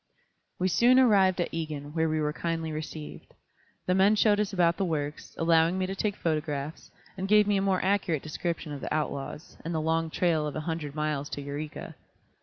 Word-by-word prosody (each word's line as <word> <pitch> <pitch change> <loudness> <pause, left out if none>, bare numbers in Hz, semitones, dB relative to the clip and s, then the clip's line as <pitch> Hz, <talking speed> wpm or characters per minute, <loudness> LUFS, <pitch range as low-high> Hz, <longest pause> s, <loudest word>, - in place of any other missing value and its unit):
We 185 - +1
soon 240 +7 +5
arrived 195 -7 +5
at 175 - -1
Egan, 150 -3 -4
where 160 -1 +1
we 155 0 0
were 150 0 0
kindly 165 -1 -2
received. 155 0 -7 0.5
The 180 - +2
men 195 +3 +5
showed 210 -1 +4
us 210 -1 0
about 170 -3 +2
the - - 0
works, 150 -4 -3
allowing 165 +2 +3
me 185 - 0
to 190 - -3
take 205 0 -1
photographs, 155 -2 -3 0.3
and 190 - -2
gave 210 +1 +6
me 205 0 +2
a - - +1
more 195 -1 +1
accurate 190 -6 +1
description 160 0 -4
of 145 - -6
the - - -5
outlaws, 150 0 -3
and 165 0 -3
the - - +1
long 160 +1 0
trail 160 -2 +1
of 150 - -5
a 155 - -2
hundred 155 -2 -4
miles 150 -2 -2
to 145 - -5
Eureka. 145 +2 -6
165 Hz, 205 wpm, -28 LUFS, 155-190 Hz, 0.5 s, gave